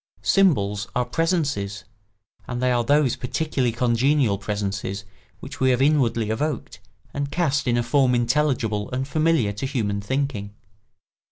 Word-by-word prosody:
Symbols 105 - +2
are 125 - +1
presences, 140 - -1 0.6
and 120 -1 -4
they 125 0 +2
are 120 -1 +2
those 140 0 +3
particularly 130 -1 -1
congenial 120 -1 +2
presences 100 -1 -3 0.4
which - - -9
we 130 - +3
have 125 -1 +2
inwardly 130 -6 +2
evoked 150 +7 -3 0.3
and 140 0 -2
cast 145 -4 0
in 120 -1 +2
a 120 - +1
form 125 +1 +3
intelligible 120 -4 0
and 130 +1 -3
familiar 155 -7 +2
to 105 +6 -4
human 105 -7 -2
thinking. 105 -3 -3
125 Hz, 140 wpm, -23 LUFS, 105-145 Hz, 0.6 s, those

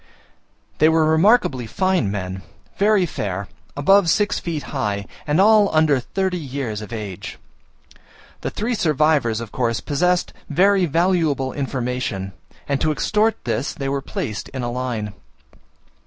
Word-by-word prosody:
They 155 - +6
were 160 -1 +3
remarkably 160 - +3
fine 185 - +1
men, 95 -1 -4 0.3
very 205 -2 +3
fair, 100 - -4 0.3
above 195 +5 +4
six 205 +4 +2
feet 160 -4 -4
high, 105 -7 -1 0.2
and 150 +4 +2
all 210 0 +6
under 155 -4 +4
thirty 185 +7 -2
years 130 -7 -4
of 105 - -9
age. 105 -5 -6 1.0
The - - -2
three 230 +4 -2
survivors 150 - +2
of 115 -2 -7
course 115 -4 0
possessed 175 - 0 0.2
very 185 +4 +3
valuable 165 -5 +1
information 125 -8 -3 0.4
and 140 -1 -1
to 155 - +2
extort 215 +7 +1
this 120 +3 -2
they 135 -1 -3
were 140 0 -1
placed 110 -5 -5
in 130 -2 -5
a 120 - -2
line. 120 -5 -3
145 Hz, 140 wpm, -21 LUFS, 120-180 Hz, 1.0 s, They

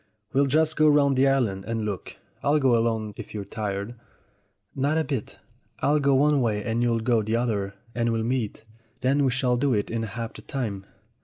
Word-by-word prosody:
We'll 140 +1 +3
just 155 +3 +2
go 155 0 +5
round 140 -2 +4
the 135 +1 +4
island 115 -8 +1
and 115 -1 -2
look. 100 -3 -5 0.3
Or - - +1
I'll 155 - +4
go 130 -4 +4
alone, 115 -2 0
if - - -8
you're 100 -2 -4
tired." 100 +2 -4 0.8
"Not 145 +4 +1
a 160 - +2
bit. 135 -8 -4 0.4
I'll 150 +1 +2
go 140 -1 +3
one 145 +1 +4
way 105 -3 0
and 115 0 -1
you'll 115 -1 +1
go 115 -1 +2
the 110 +2 -1
other, 105 -5 -1 0.2
and 115 -1 0
we'll 115 -1 0
meet. 115 -3 -2 0.4
Then 135 +3 +2
we 135 - +3
shall 125 -1 +1
do 135 -1 +2
it 105 - -1
in 115 0 -1
half 115 +1 -5
the - - -11
time." 105 -8 -4
120 Hz, 210 wpm, -25 LUFS, 110-135 Hz, 0.8 s, go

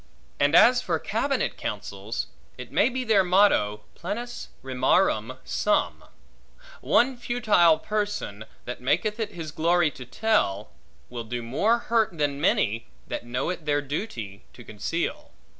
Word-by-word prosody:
And - - +3
as - - +7
for - - 0
cabinet - - -1
counsels, 100 +3 -4 0.3
it 125 -1 -9
may 220 - +3
be 260 0 -3
their 220 -5 +4
motto, 180 - +3
plenus 240 +7 -5 0.2
rimarum 130 - +1
sum: 210 - 0 0.8
one 260 +2 +3
futile 215 -9 +3
person, 205 - -3 0.2
that 125 - -6
maketh 185 - 0
it 220 -2 -3
his 160 -3 -6
glory 165 0 +2
to 130 - -10
tell, 125 - 0 0.4
will 120 -1 -5
do 120 +1 -4
more 200 - +2
hurt 225 -6 0
than 145 -1 -1
many, 115 - +1 0.2
that 120 - -5
know 125 +8 -1
it 165 -4 -7
their 145 0 +2
duty 130 - -5
to 120 - -13
conceal. 165 - -3
160 Hz, 140 wpm, -26 LUFS, -, 0.8 s, as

